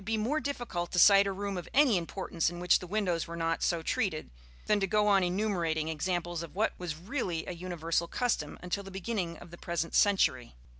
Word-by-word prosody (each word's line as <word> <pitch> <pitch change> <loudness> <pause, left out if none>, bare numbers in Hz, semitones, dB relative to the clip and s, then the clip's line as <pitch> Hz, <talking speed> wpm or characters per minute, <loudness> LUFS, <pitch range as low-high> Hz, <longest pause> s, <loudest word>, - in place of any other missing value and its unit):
In - - -13
fact, 200 - -7
it - - 0
would 215 -1 0
be 230 - -1
more 305 +2 +1
difficult 240 - -4
to - - -1
cite 200 +2 +7
a - - 0
room 195 -1 -3
of 175 - -10
any 275 -6 +5
importance 170 -1 -1
in 175 0 -8
which 180 0 +4
the 180 - -8
windows 180 -4 -1
were 170 - -6
not 165 0 -1
so 170 -2 0
treated, 160 - -1 0.3
than 210 -1 +2
to 195 - 0
go 210 +2 +2
on 195 -2 +4
enumerating 175 -5 0
examples 175 +1 -2
of 170 - -9
what 215 +3 +1
was 175 -4 -4
really 180 - -3
a - - -5
universal 170 -1 -2
custom 225 -9 -1
until 180 +3 -2
the 195 - -10
beginning 190 -3 -3
of 170 - -13
the 175 - -11
present 170 -1 -3
century. 130 - +2
180 Hz, 235 wpm, -30 LUFS, 170-205 Hz, 0.3 s, cite